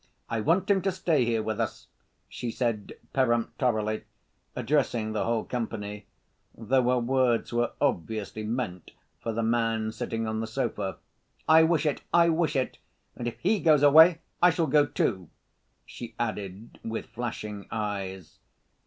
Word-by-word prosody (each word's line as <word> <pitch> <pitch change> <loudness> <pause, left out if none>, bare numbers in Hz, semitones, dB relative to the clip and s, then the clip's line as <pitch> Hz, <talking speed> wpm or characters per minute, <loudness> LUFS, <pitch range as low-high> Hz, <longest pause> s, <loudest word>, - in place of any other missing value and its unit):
I 115 -1 0
want 175 - +2
him 200 -2 +3
to 195 - 0
stay 165 -8 +1
here 115 -2 0
with 110 0 -3
us," 115 - -3 0.4
she 120 - -5
said 115 -3 -2 0.2
peremptorily, 120 -3 0 0.5
addressing 120 -7 0
the 110 - -1
whole 115 -1 0
company, 105 -4 -5 0.5
though 125 +4 +2
her 125 - +3
words 120 -1 +1
were 120 0 0
obviously 110 +3 -1
meant 105 -6 -4 0.3
for 115 - -3
the 115 +1 -1
man 115 -1 +1
sitting 115 0 -3
on 110 0 -2
the 110 - -3
sofa. 105 -3 -2 0.5
"I 160 +1 +7
wish 160 -1 +3
it, 150 - 0
I 170 0 +5
wish 160 -2 +1
it! 130 -1 -1 0.4
And 120 - -4
if 120 - -4
he 205 +4 +2
goes 155 -4 +4
away 160 +4 +7 0.2
I 180 - +7
shall 165 -1 +1
go, 145 0 +4
too!" 95 - -1 0.6
she 115 -2 -9
added 105 -2 -5
with 115 0 -4
flashing 105 -4 -6
eyes. 95 -5 -4
115 Hz, 155 wpm, -27 LUFS, 110-145 Hz, 0.6 s, I